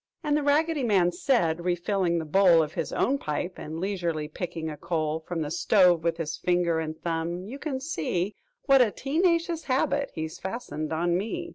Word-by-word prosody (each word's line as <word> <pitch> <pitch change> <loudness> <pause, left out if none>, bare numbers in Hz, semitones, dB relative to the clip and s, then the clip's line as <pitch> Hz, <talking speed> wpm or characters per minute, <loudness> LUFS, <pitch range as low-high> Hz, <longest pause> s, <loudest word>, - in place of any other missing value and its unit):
And 295 -1 +1
The 300 - +2
Raggedy 300 +2 +2
Man 195 -7 +3
said, 175 - +1
refilling 175 0 0
the 160 - -2
bowl 170 0 +5
Of 150 - -6
his - - -3
own 275 +1 +1
pipe 175 - -3
and 160 +2 -6
leisurely 170 -5 -2
picking 165 0 -5
a 155 - -4
coal 155 0 -2
From 170 -3 -2
the 150 - -5
stove 180 -3 +4
with 165 -1 0
his 155 -2 -3
finger 175 -2 +1
and 155 0 -4
thumb, 170 +1 -2
"You 260 +7 -8
can 275 -4 -3
see 190 - -2 0.3
What 275 -2 +6
a 240 - +4
tee 280 - -2
nacious 335 -2 +1
habit 280 +2 +1
he's 160 0 -5
fastened 190 -7 -5
on 170 +2 +1
me! 340 - -4
175 Hz, 190 wpm, -27 LUFS, 165-260 Hz, 0.3 s, What